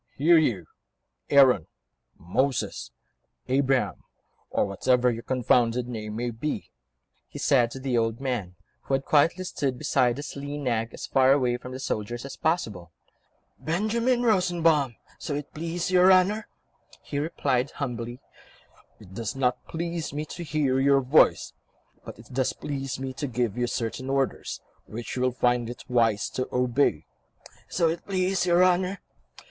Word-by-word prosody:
"Here, 165 +4 +6
you... 110 - 0 0.6
Aaron, 135 - +5 0.5
Moses, 130 +10 -1 0.6
Abraham, 135 0 +1 0.5
or - - +1
whatever 125 +5 +2
your 115 0 -5
confounded 125 -1 +1
name 110 -3 -5
may 120 +1 -2
be," 130 +7 -4 0.6
he - - -10
said 125 -4 +3
to 135 - -8
the 130 -3 0
old 115 0 -1
man, 120 -10 -3 0.3
who 135 - 0
had 135 - -3
quietly 165 +5 +3
stood 135 -8 -2
beside 125 0 +1
his 145 - -6
lean 145 +1 -5
nag, 115 -3 -1
as - - -7
far 135 0 +4
away 125 -3 +1
from 125 +1 -10
the 130 - -6
soldiers 120 -1 -3
as 140 - -7
possible. 105 - -2 0.7
"Benjamin 230 +8 0
Rosenbaum, 170 - +2 0.2
so 145 - -3
it 145 0 -6
please 170 +3 -3
your 185 +1 +6
Honour," 190 +4 +3 0.6
he 140 - -3
replied 140 -4 0
humbly. 120 -3 -5 0.8
"It 95 -3 -14
does 115 +5 -4
not 125 -2 -1
please 170 -2 -4
me 150 +1 -3
to 170 +3 -7
hear 145 -5 0
your 140 0 +4
voice, 135 +4 +3 0.5
but - - -9
it 115 +2 -15
does 130 0 0
please 135 -3 -5
me 130 0 -4
to 145 +2 -4
give 120 -4 -1
you 125 0 0
certain 120 +3 -3
orders, 135 0 -1 0.3
which 115 +1 -6
you 125 - -2
will 130 0 +2
find 120 -1 +1
it 120 - -8
wise 115 -4 +2
to 130 - -3
obey." 125 - +1 0.6
"So 170 -2 +2
it 165 +1 -2
please 185 -2 0
your 175 +1 +5
Honour 185 +2 +1
130 Hz, 155 wpm, -26 LUFS, 120-155 Hz, 0.8 s, Here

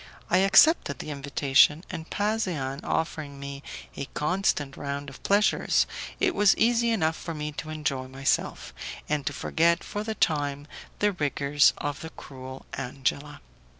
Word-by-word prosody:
I 180 - +5
accepted 195 - +5
the 155 - -6
invitation, 140 +2 +3
and 165 -3 -7
Pasean 185 -11 -1
offering 155 -3 -2
me 140 0 -7 0.3
a - - -4
constant 150 -4 0
round 140 0 -5
of 135 - -14
pleasures, 205 +2 +3 0.3
it 380 -2 +2
was 205 - +4
easy 235 0 +3
enough 165 -8 +1
for 165 0 -6
me 150 0 -4
to 150 +1 -7
enjoy 140 -4 -2
myself, 135 +1 -1 0.3
and 150 -2 -1
to - - +1
forget 170 +3 +1
for 210 0 -4
the 220 0 -3
time 145 -5 0 0.3
the 210 0 +2
rigours 145 -3 +2
of 145 -1 -3
the 160 - -7
cruel 130 -3 -10
Angela. 140 +3 -3
150 Hz, 150 wpm, -27 LUFS, 140-185 Hz, 0.3 s, I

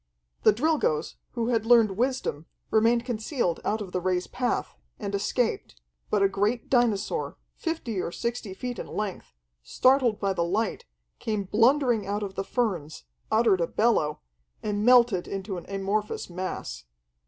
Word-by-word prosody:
The - - +6
Drilgoes, 285 - 0 0.2
who 235 -1 -1
had 230 -3 +2
learned 225 -2 +5
wisdom, 245 - -1 0.2
remained 230 +2 +3
concealed 225 - -1
out 215 +1 -1
of 190 -3 -6
the 180 - -1
Ray's 180 0 0
path, 250 -1 -2 0.2
and 205 -2 -5
escaped, 200 - -1 0.3
but 205 -2 +2
a - - +6
great 205 +4 -1
dinosaur, 230 -5 +1 0.2
fifty 255 - -3
or 170 - -3
sixty 235 -2 -4
feet 245 +4 -5
in - - -5
length, 200 - -5 0.3
startled 255 - +3
by 195 -1 0
the 170 -2 0
light, 200 +5 -1 0.3
came 215 -2 -1
blundering 230 +1 +3
out 205 +1 -1
of 195 -1 -5
the 195 - -3
ferns, 190 - -2 0.3
uttered 220 -5 +3
a 165 - +1
bellow, 210 -10 +1 0.4
and 210 -1 -1
melted 240 -6 +5
into 195 0 -4
an - - -15
amorphous 200 0 -2
mass. 185 - -5
215 Hz, 155 wpm, -27 LUFS, 195-240 Hz, 0.4 s, The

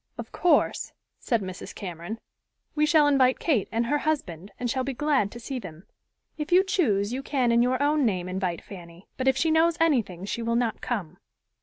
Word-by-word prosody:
"Of - - -7
course," 355 - +1 0.3
said 230 -5 0
Mrs. 185 0 -8
Cameron, 175 +3 -6 0.6
"we 300 0 +2
shall 310 -2 +5
invite 260 -3 +4
Kate 270 - 0
and 230 +1 0
her 295 +5 +1
husband, 200 - -3
and 245 - -1
shall 260 +2 -1
be 265 0 -4
glad 275 -7 +1
to 235 - -9
see 260 +2 -5
them. 175 -4 -10 0.5
If 300 +3 -4
you 365 +2 +6
choose, 240 - +1
you 260 - -3
can 260 -4 0
in 235 0 +4
your 255 +1 +1
own 295 0 +2
name 185 -6 0
invite 185 -2 -3
Fanny, 175 -2 -12
but 260 - -3
if 265 0 +3
she 320 +3 +2
knows 325 +1 +3
anything 230 - +1
she 235 - -3
will 230 0 0
not 235 -2 0
come." 180 -9 -4
240 Hz, 200 wpm, -26 LUFS, 195-290 Hz, 0.6 s, you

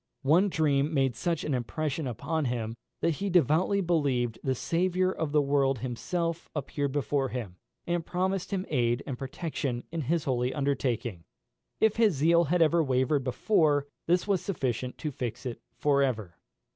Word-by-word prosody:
One 170 +9 +4
dream 150 -3 +2
made 135 -3 +2
such 170 +5 -1
an 150 - -1
impression 135 +5 -2
upon 145 +6 -2
him, 115 -3 -2 0.3
that 165 -3 +1
he 200 - 0
devoutly 175 +4 +3
believed 140 -10 0
the 130 -1 0
Saviour 185 +6 +1
of 160 -5 -3
the 150 -1 +3
world 140 -1 +2
himself 165 +8 -3
appeared 145 -1 -2
before 140 -1 0
him, 110 -9 -5 0.3
and 175 -1 -1
promised 185 +2 -1
him 195 -2 -2
aid 120 -2 +1
and 135 - -3
protection 135 -2 -3
in 165 -1 -2
his 155 +3 0
holy 125 -1 0
undertaking. 125 - -1 0.6
If 220 -1 +3
his 220 -7 +4
zeal 170 +4 +4
had 170 +3 +3
ever 165 +1 +3
wavered 130 +1 +1
before, 145 - +2 0.2
this 175 +3 +2
was 195 -3 +2
sufficient 130 - -2
to 155 - -3
fix 125 -1 -5
it 120 -2 -5 0.2
for 140 -1 +3
ever. 110 -10 -1
145 Hz, 165 wpm, -29 LUFS, 130-170 Hz, 0.6 s, One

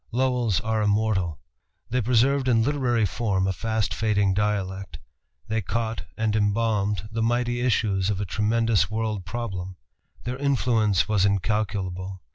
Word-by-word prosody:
Lowell's 125 -4 +1
are 110 -1 0
immortal. 105 -6 +1 0.5
They 125 +1 +1
preserved 130 +4 +2
in 115 -3 +4
literary 125 -5 +1
form 100 -2 0
a 95 - 0
fast 110 +1 -1
fading 105 -3 +1
dialect; 95 -4 -2 0.5
they 110 0 0
caught 110 -1 -3
and 110 -1 0
embalmed 105 -2 0
the 115 0 -2
mighty 120 +1 +1
issues 105 -6 +1
of 100 -2 -1
a 100 - -1
tremendous 105 -1 +1
world 110 -3 -2
problem. 95 -4 -5 0.5
Their 125 +1 -3
influence 120 -8 +2
was 105 -3 +2
incalculable. 100 -2 -1
110 Hz, 135 wpm, -25 LUFS, 100-115 Hz, 0.5 s, in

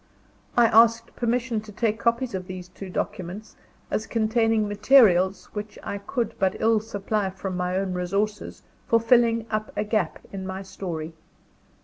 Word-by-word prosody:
I 240 - +7
asked 230 +1 +4
permission 235 -1 0
to 215 0 -12
take 220 +1 -1
copies 235 +1 0
of 185 -1 -4
these 185 -1 -7
two 190 +1 -9
documents, 185 +3 -5 0.4
as 215 - -1
containing 225 -1 +1
materials, 205 -3 +4
which 210 0 -6
I 200 - -4
could 230 +2 -2
but 190 -1 +2
ill 225 0 +3
supply 210 -1 -2
from 190 0 -5
my 180 +1 -1
own 190 -1 -1
resources, 200 +4 -2 0.2
for 230 - +4
filling 230 -1 +3
up 215 0 -2
a - - +1
gap 210 -6 -1 0.2
in 190 -1 -5
my 190 +1 -5
story. 165 -4 -6
210 Hz, 155 wpm, -25 LUFS, 190-230 Hz, 0.4 s, I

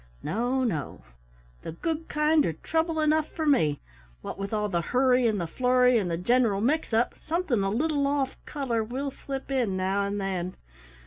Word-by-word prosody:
No, 245 +4 0
no; 180 - -3 0.6
the - - -6
good 325 - -3
kind 300 0 +3
are 165 - -1
trouble 320 - -1
enough 310 0 +2
for 320 - -3
me. 160 - +2 0.4
What - - -6
with 195 0 -3
the 210 -5 0
hurry 250 +3 +3
and 215 -3 0
the 170 - -1
flurry 250 +5 +3
and 185 -4 -2
the 165 - -1
general 225 +1 +2
mix 280 +8 0
up, 225 +2 +2
something 320 - 0
a 195 - 0
little 285 +5 +1
off 280 -2 0
color 250 -6 -1
will 265 +5 -4
slip 270 0 -7
in 235 -8 0
now 195 +2 0
and 205 +1 -3
then. 185 -2 -3
250 Hz, 180 wpm, -27 LUFS, 200-285 Hz, 0.6 s, kind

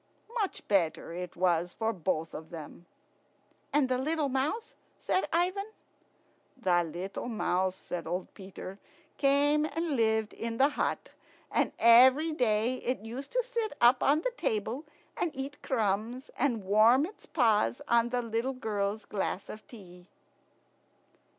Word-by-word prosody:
Much 400 -3 -3
better 170 -4 +1
it 180 0 -6
was 175 -1 +1
for 225 0 -1
both 165 -3 -2
of 160 0 -8
them. 165 +1 -10 0.8
"And 290 -2 +3
the 255 0 0
little 300 +1 0
mouse?" 285 - -2 0.2
said 375 - 0
Ivan. 365 +4 0 0.9
"The 180 -8 +2
little 180 +7 -5
mouse," 190 -5 0
said 175 -3 -6
old 180 +3 -4
Peter, 195 0 -9 0.4
"came 285 +2 +4
and 320 -1 -2
lived 220 -2 +1
in 230 0 -4
the 275 +3 +5
hut, 290 - -2 0.4
and - - +1
every 260 +7 +6
day 245 -3 +1
it 250 -4 -3
used 255 +5 -7
to - - +2
sit 465 -3 -3
up 245 +2 +5
on 295 +3 +3
the - - -2
table 225 +7 -2 0.3
and 350 - 0
eat 275 +2 -6
crumbs, 225 +1 -1
and 240 -6 0
warm 220 +8 +5
its 405 +5 -12
paws 215 - +2
on 235 0 +3
the 245 0 -1
little 230 +3 -1
girl's 210 -4 -2
glass 195 -1 -3
of 215 - -9
tea." 180 -6 -13
230 Hz, 145 wpm, -30 LUFS, 195-280 Hz, 0.9 s, every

